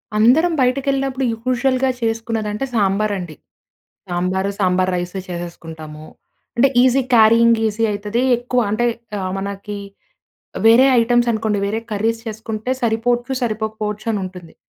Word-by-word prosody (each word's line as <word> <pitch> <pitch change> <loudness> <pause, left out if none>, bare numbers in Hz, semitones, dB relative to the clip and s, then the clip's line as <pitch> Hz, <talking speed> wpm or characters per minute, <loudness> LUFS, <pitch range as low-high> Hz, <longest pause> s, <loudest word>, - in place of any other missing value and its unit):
అందరం 255 +11 +4
బయటకెళ్ళినప్పుడు 270 +1 0
యూజువల్‌గా 255 +3 0
చేసుకునేదంటే 225 0 -2
సాంబార్ 205 -1 +1
అండి. 175 -4 -7 0.7
సాంబారు, 185 +2 -1
సాంబార్ 185 -1 +1
రైస్ 175 +1 -3
చేసేసుకుంటాము. 160 -3 -8 0.5
అంటే 255 +3 +5
ఈజీ 260 +1 +3
క్యారీయింగ్ 230 +1 +6
ఈజీ 220 +2 -1
అ‌యితది 210 +4 -2 0.2
ఎక్కువ 245 +1 0
అంటే 225 +3 +1 0.3
ఆహ్, 185 -1 -3
మనకి 200 +1 -5 0.9
వేరే 235 +4 +7
ఐటెమ్స్ 240 +1 +2
అనుకోండి 220 -2 -1
వేరే 215 +3 -2
కర్రీస్ 225 +2 -1
చేసుకుంటే 220 +1 -5
సరిపోవచ్చు, 240 +2 0
సరిపోకపోవచ్చు 215 -2 -3
అని 210 - -1
ఉంటుంది. 180 -3 -10
220 Hz, 120 wpm, -19 LUFS, 200-240 Hz, 0.9 s, వేరే